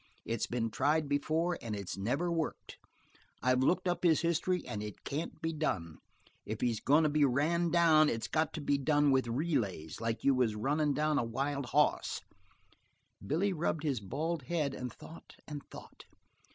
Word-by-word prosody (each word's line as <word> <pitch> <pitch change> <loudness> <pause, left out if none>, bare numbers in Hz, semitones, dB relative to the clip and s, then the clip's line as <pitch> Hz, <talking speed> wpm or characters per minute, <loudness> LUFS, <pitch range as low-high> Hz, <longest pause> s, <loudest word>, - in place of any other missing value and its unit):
It's 115 -1 -1
been 115 -2 -2
tried 150 +5 +1
before 160 +5 0
and 110 -2 -4
it's 100 -3 -5
never 135 - -1
worked. 165 -2 -3 0.6
I've 130 0 +3
looked 175 +7 +2
up 175 0 -1
his 165 -3 +4
history 175 +2 0
and 105 - -4
it 105 -1 -8
can't 155 +4 -4
be 165 0 -1
done. 85 - -2 0.5
If 110 +1 -5
he's 115 -3 +1
goin' 150 +4 +4
to 155 - +3
be 150 0 +2
ran 155 +6 +2
down 160 -3 +5
it's 115 -5 -2
got 155 -1 0
to 160 - -4
be 140 0 +1
done 145 0 +3
with 130 -2 +2
relays, 115 - -2
like 115 0 -2
you 140 - +5
was 125 -4 +1
runnin' 145 +6 +1
down 150 -1 +2
a - - +1
wild 135 +4 -2
hoss." 150 +4 +1 1.0
Billy 175 - 0
rubbed 160 -2 -1
his 140 -6 0
bald 155 - -3
head 150 -4 -1
and 125 -2 -5
thought 160 +8 -13
and 150 -1 -6
thought. - - -12
145 Hz, 180 wpm, -32 LUFS, 120-160 Hz, 1.0 s, down